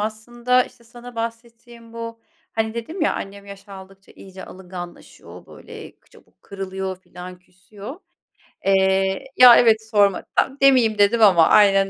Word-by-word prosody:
aslında 240 +4 -1
işte 235 - -19
sana 240 +1 -13
bahsettiğim 230 0 -9
bu, 230 0 -8 0.3
hani, 220 0 -3
dedim 315 +11 -7
ya: - - +1
"Annem 200 0 -8
yaş 200 0 -13
aldıkça 195 0 -14
iyice 190 -1 -13
alınganlaşıyor, 180 -1 -12
böyle, - - -13 0.2
çabuk - - -24
kırılıyor 190 -1 -6
filan, 180 0 -12
küsüyor." 200 - -13 0.7
Eee 190 +1 +1
Ya, 245 -1 +9
evet, 220 -2 +2
sorma. 205 -3 +2
Tam 270 - 0
demeyeyim 250 -6 +3
dedim 205 +3 +2
ama 180 -6 +5
aynen 195 -2 +4
210 Hz, 135 wpm, -20 LUFS, 190-235 Hz, 0.7 s, Ya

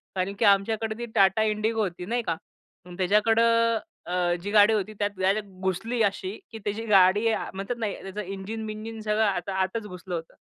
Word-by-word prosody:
कारण 190 +1 -1
की - - +3
आमच्याकडे 215 +2 +2
ती 240 - -4
टाटा 195 +2 +4
इंडिगो 220 +1 0
होती, 180 -2 -4
नाही 235 +5 -1
का? 165 - +1 0.5
मग 180 -1 -11
त्याच्याकडं 225 +4 +3 0.3
अ, 180 - -5 0.3
जी 205 - -4
गाडी 210 +1 +6
होती 215 0 -1
त्यात 205 0 +1
डायरेक्ट 195 +3 +1
घुसली 195 +6 -1
अशी, 195 0 -1 0.2
की 225 - -8
त्याची 210 +2 -4
गाडी 200 +1 +5
आ - - -2
म्हणतात 195 +5 -4
ना, 225 - 0
त्याचं 195 +2 -5
इंजिन-बिंजिन 215 +3 -6
सगळं 215 0 +1
आत 190 -2 -1
आतच 190 +3 -1
घुसलं 180 -1 -6
होतं. 165 -1 -6
205 Hz, 185 wpm, -26 LUFS, 190-220 Hz, 0.5 s, गाडी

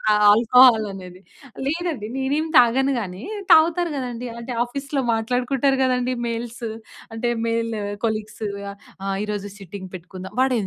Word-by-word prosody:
ఆ - - +6 0.2
ఆల్కహాల్ 230 +1 +6
అనేది. 185 -1 -10 0.5
లేదండి. 315 -7 -2
నేనేం 285 +4 0
తాగను 260 +3 +4
గానీ 190 +1 -6 0.3
తాగుతారు 335 +1 +5
గదండీ. 250 -2 -4
అంటే 235 +2 -6
ఆఫీస్‌లో 275 +3 -3
మాట్లాడుకుంటారు 250 +4 +1
గదండీ 250 0 +1 0.2
మెయిల్స్, 235 +1 -5 0.5
అంటే 225 +2 -2 0.2
మెల్ 230 0 -1 0.3
కొలీగ్స్. 215 0 -4 0.6
"ఆహ్, 195 0 -1
ఈరోజు 205 -1 -4
సిట్టింగ్ 190 0 -9
పెట్టుకుందాం." 185 +2 -9
వాడేం 250 -6 +2
235 Hz, 125 wpm, -22 LUFS, 210-265 Hz, 0.6 s, ఆ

